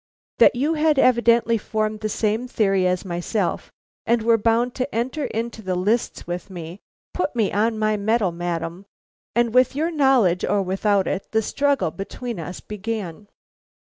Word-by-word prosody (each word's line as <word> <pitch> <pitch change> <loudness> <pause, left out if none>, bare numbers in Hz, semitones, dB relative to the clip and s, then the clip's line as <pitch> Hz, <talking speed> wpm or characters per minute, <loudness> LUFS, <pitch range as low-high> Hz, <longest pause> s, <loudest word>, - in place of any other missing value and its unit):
That - - +6
you 285 +6 +1
had 310 -1 +2
evidently 235 -3 +4
formed 215 0 -2
the 215 0 -3
same 220 +3 -1
theory 195 -6 +1
as 180 +1 -1
myself 175 +2 -2 0.3
and 235 -1 +1
were 230 0 +4
bound 230 +3 +1
to 255 -1 -4
enter 260 +5 -1
into 225 0 -4
the 185 -3 -2
lists 210 +6 -1
with 175 +2 -5
me, 175 0 -8 0.3
put 330 -7 -2
me 220 -4 +1
on 220 +2 +1
my 215 0 +1
mettle, 210 -2 +1
madam, 170 +2 -4 0.5
and 235 -1 +2
with 255 +1 +4
your 320 +4 0
knowledge 265 - +3
or 205 -1 +1
without 195 +1 +1
it, 195 - -3
the 220 0 +2
struggle 280 - 0
between 200 +5 -6
us 180 +3 -7
began." 210 -3 -5
215 Hz, 165 wpm, -22 LUFS, 190-240 Hz, 0.5 s, That